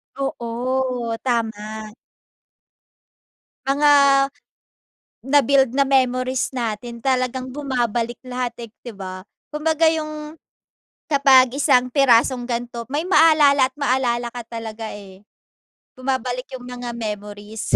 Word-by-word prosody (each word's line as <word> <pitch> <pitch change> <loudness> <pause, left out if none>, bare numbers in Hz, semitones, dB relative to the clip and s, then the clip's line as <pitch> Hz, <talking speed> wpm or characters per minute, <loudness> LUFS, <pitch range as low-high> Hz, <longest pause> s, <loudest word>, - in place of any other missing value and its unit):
Oo 250 -2 -2
tama. 220 -3 -3 1.7
Mga 290 +2 +3 1.3
nabuild 270 -2 +3
na 275 +1 +3
memories 255 -1 +1
natin 235 0 -4
talagang 255 0 -1
bumabalik 240 -4 -2
lahat 250 -1 -3
eh, 230 - -8 0.2
di 240 - -7
ba? 185 -2 -8 0.3
Kumbaga 320 +1 +2
yung 305 -1 -5 0.7
kapag 270 -3 +6
isang 255 -3 +3
pirasong 250 -2 +3
ganto, 235 -1 -4
may 295 +3 -1
maalala 295 -7 +5
at - - -52
maalala 250 -3 0
ka 245 - -6
talaga 225 -1 -6
eh. 195 -1 -12 0.7
Bumabalik 255 -1 -2
yung 250 - -10
mga 245 -1 -6
memories. 210 -1 -4
250 Hz, 100 wpm, -21 LUFS, 230-275 Hz, 1.7 s, kapag